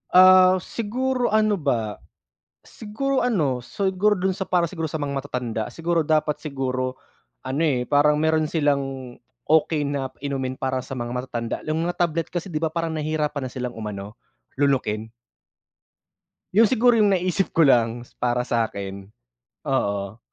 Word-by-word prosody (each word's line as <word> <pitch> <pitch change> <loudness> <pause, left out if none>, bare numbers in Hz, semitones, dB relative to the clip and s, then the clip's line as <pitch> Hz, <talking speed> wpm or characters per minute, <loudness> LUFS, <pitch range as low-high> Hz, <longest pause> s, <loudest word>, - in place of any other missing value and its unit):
Ah, 185 0 +8
siguro 250 +3 -1
ano 215 -2 +2
ba, 115 -8 -1 0.7
siguro 260 +6 -2
ano, 150 - 0
siguro 195 - 0
dun 190 +1 0
sa 190 - -5
para 180 -2 +1
siguro 160 -2 -4
sa 155 - -3
mga 140 -2 -2
matatanda, 125 -5 -3
siguro 170 0 0
dapat 155 -1 0
siguro 130 -3 -3 0.5
ano, 140 +5 -1
eh, 130 -6 +1
parang 150 +1 +3
meron 155 0 +1
silang 135 -5 -1 0.3
okey 155 -1 +2
na 140 -2 -2
inumin 135 -2 -3
para 130 -1 -1
sa 135 0 -7
mga 120 0 -4
matatanda, 125 -2 -3
yung 160 +2 -1
mga 175 - -1
tablet 165 -2 0
kasi 175 +2 -3
'di 155 - -1
ba, 160 - 0
parang 165 -2 -2
nahihirapan 150 -2 -2
na 125 - -8
silang 125 -3 -5
umano, 105 0 -6 0.4
lunukin. 110 -6 0 1.4
'Yon 225 - +7
siguro 245 +1 +4
yung 210 -3 +4
naisip 185 0 0
ko 165 -3 +4
lang, 120 -1 +2 0.2
para 125 +1 +1
sa'kin, 100 -4 -3 0.6
oo. 100 +1 -1
150 Hz, 150 wpm, -23 LUFS, 125-175 Hz, 1.4 s, Ah